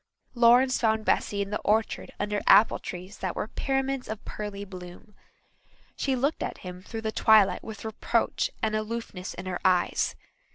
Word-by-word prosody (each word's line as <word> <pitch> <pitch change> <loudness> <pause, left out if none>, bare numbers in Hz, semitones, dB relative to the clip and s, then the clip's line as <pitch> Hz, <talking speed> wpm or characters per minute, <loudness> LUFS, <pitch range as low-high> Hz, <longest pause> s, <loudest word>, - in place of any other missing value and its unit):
Lawrence 245 +2 +5
found 220 -1 +1
Bessy 200 -1 +1
in 200 - -9
the 210 - -1
orchard 220 +1 0
under 205 0 -1
apple 220 - +6
trees 185 +2 -8
that 185 -2 -3
were - - -2
pyramids 270 -1 -1
of 220 -1 -6
pearly 205 -1 -6
bloom. 180 +2 -11 0.8
She 270 -1 0
looked 280 +5 0
at - - -3
him 180 0 -7
through 225 +3 -6
the 220 0 -2
twilight 215 -3 +4
with 220 -1 -8
reproach 220 -1 0
and 215 -1 +1
aloofness 215 -4 -4
in 180 - -7
her 185 -1 -3
eyes. 185 -2 +2
215 Hz, 165 wpm, -27 LUFS, 195-230 Hz, 0.8 s, apple